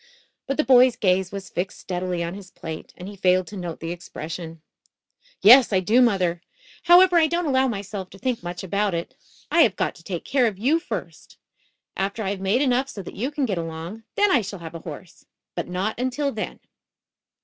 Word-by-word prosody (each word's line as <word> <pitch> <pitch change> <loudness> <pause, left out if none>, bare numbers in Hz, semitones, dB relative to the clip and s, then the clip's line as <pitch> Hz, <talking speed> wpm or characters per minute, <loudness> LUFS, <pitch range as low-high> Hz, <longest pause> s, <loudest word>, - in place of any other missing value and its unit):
But 275 - -2
the 305 - +3
boy's 255 -2 +6
gaze 185 -2 +1
was 195 -1 -7
fixed 180 +2 -3
steadily 180 -1 -3
on 170 +1 -4
his 195 -1 -10
plate 160 -4 -8
and 180 - -8
he 205 - -8
failed 185 -1 +2
to 205 - -10
note 175 -4 -5
the 165 +1 -4
expression. 165 -1 -7 0.8
"Yes, 245 +4 +8
I 190 - +3
do, 215 +7 +3
mother. 185 -7 +2 0.4
However, 355 +1 +7
I 320 - +4
don't 340 +2 -1
allow 265 -2 +2
myself 200 -4 -5
to - - -14
think 250 +2 -2
much 175 +1 -6
about 200 0 0
it. 170 - -4 0.4
I 340 - +5
have 220 - +4
got - - -1
to 165 - -17
take 175 -1 -5
care 260 -3 +2
of 205 -4 -3
you, 275 +11 +2
first. - - -7 0.6
After 200 +3 -2
I 195 - -1
have 195 -1 -5
made 205 +8 +2
enough 260 0 +1
so 200 - -7
that - - -9
you 245 +7 -2
can 290 -2 -1
get 195 -7 -2
along, 165 +6 -6
then 410 -1 +3
I 255 - +4
shall 200 0 -6
have 165 -2 -9
a 165 - -6
horse. 160 +2 -11 0.3
But - - -4
not 190 +6 -2
until 260 +3 -1
then." 215 -3 -5
195 Hz, 210 wpm, -24 LUFS, 180-255 Hz, 0.8 s, Yes